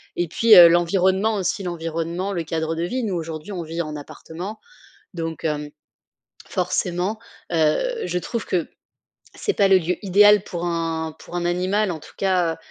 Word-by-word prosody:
Et 175 - -1
puis, 225 +7 +5
heu, 170 -1 +11
l'environnement 190 +5 +2
aussi, 195 +1 -1
l'environnement, 170 +2 -3
le 170 -3 -2
cadre 160 0 -2
de 165 - -2
vie, 250 +8 -2
nous 200 -5 -2
aujourd'hui, 160 +1 -6
on 180 -3 -4
vit 165 +1 -4
en 155 -1 -6
appartement. 170 +7 -8 0.6
Donc 165 -2 -5
hem, 150 -1 -2 0.8
forcément, 185 +3 -1 0.4
heu, 425 - +1
je 180 - -2
trouve 230 +4 -4
que 175 -3 -1 0.7
c'est 415 - -1
pas 200 - +3
le 195 - +6
lieu 180 0 -1
idéal 205 +1 +6
pour 175 0 -5
un 165 -2 -2
pour 175 - -10
un 175 - -1
animal 185 +3 0
en 160 - -5
tout - - -15
cas 180 -4 +1
175 Hz, 170 wpm, -22 LUFS, 165-195 Hz, 0.8 s, heu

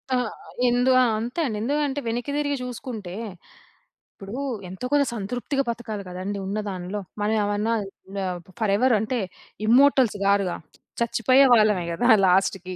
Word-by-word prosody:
ఆ! - - +3 0.5
ఎందు 245 +2 +3
ఆ! - - +5 0.2
అంతే 240 +8 -4
అండి. 220 -6 -2
ఎందుకంటే 285 +2 0
వెనక్కి 240 +4 -2
తిరిగి 285 -1 0
చూసుకుంటే, 235 -6 -6 1.0
ఇప్పుడు 195 +4 -9 0.3
ఎంతో 190 +7 -6
కొంత 290 -1 +4
సంతృప్తిగా 245 +6 -2
బతకాలి 220 -3 -4
కదండీ. 185 +3 -4
ఉన్నదాంట్లో 200 -1 -4 0.2
మనం 210 +1 +1
ఏమన్నా 205 +2 0 0.5
ఆహ్, 180 -1 -3 0.2
ఫరెవర్ 220 +4 +3
అంటే, 235 +3 -1 0.5
ఇమ్మోర్టల్స్ 255 -2 +5
కాదుగా, 200 -3 +2 0.5
చచ్చిపోయే 255 +4 +4
వాళ్ళమే 210 -5 +3
కదా! 215 +9 0 0.2
లాస్ట్‌కి. 185 0 +1
220 Hz, 125 wpm, -24 LUFS, 200-250 Hz, 1.0 s, ఆ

